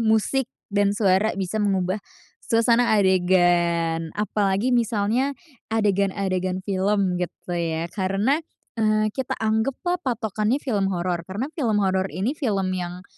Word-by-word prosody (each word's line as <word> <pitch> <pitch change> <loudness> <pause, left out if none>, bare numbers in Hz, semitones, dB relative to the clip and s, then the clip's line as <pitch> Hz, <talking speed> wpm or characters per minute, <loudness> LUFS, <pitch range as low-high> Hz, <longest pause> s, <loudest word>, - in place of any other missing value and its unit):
musik 225 +3 +1 0.2
dan 205 0 +2
suara 195 +1 +2
bisa 195 +3 -2
mengubah 195 -1 0 0.4
suasana 230 0 +3
adegan. 175 -3 +2
Apalagi 210 +2 0
misalnya 235 +4 +1 0.3
adegan-adegan 195 -3 0
film 195 -2 0
gitu 180 0 -5
ya. 165 -1 -1
Karena, 200 +9 +1 0.4
eee, 215 -1 +2
kita 265 +1 -3
anggaplah 250 +11 -1
patokannya 225 - -1
film 215 -9 -1
horor. 175 -1 -2
Karena 240 +11 -4
film 235 -10 0
horor 190 0 +1
ini 190 - -2
film 200 - -1
yang, 180 0 -5
200 Hz, 120 wpm, -24 LUFS, 185-225 Hz, 0.4 s, suasana